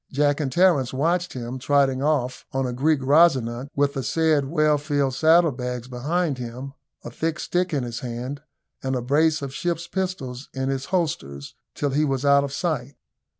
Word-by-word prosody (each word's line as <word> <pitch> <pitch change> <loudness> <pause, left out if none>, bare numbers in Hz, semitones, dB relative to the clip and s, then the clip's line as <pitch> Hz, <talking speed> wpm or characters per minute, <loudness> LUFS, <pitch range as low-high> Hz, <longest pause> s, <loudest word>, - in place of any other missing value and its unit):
Jack 145 +1 +2
and 140 -4 -1
Terence 165 -5 +3
watched 170 +6 0
him 125 +1 -5
trotting 135 -1 +2
off 135 -4 0
on 135 0 0
a 125 - -2
Greek 145 +3 +1
Rosinante 135 -4 +3
with 140 0 +2
the 135 - -3
said 155 0 +1
well 155 0 +2
filled 145 -2 0
saddle 160 +3 +4
bags 125 -1 -5
behind 145 +4 -1
him, 125 +3 -7 0.3
a - - -7
thick 165 0 -2
stick 180 +1 -1
in 140 -5 0
his 120 -1 -5
hand, 125 +3 -5 0.4
and 130 0 -2
a 125 - -1
brace 150 +3 +2
of 135 -1 -5
ship's 170 +2 -2
pistols 155 -10 -4
in 130 0 -1
his 135 0 -2
holsters, 135 - -3 0.2
till 145 -1 -1
he 145 +3 +2
was 135 -2 -1
out 140 0 +5
of 140 - -4
sight. 140 -4 -2
140 Hz, 185 wpm, -24 LUFS, 130-155 Hz, 0.4 s, out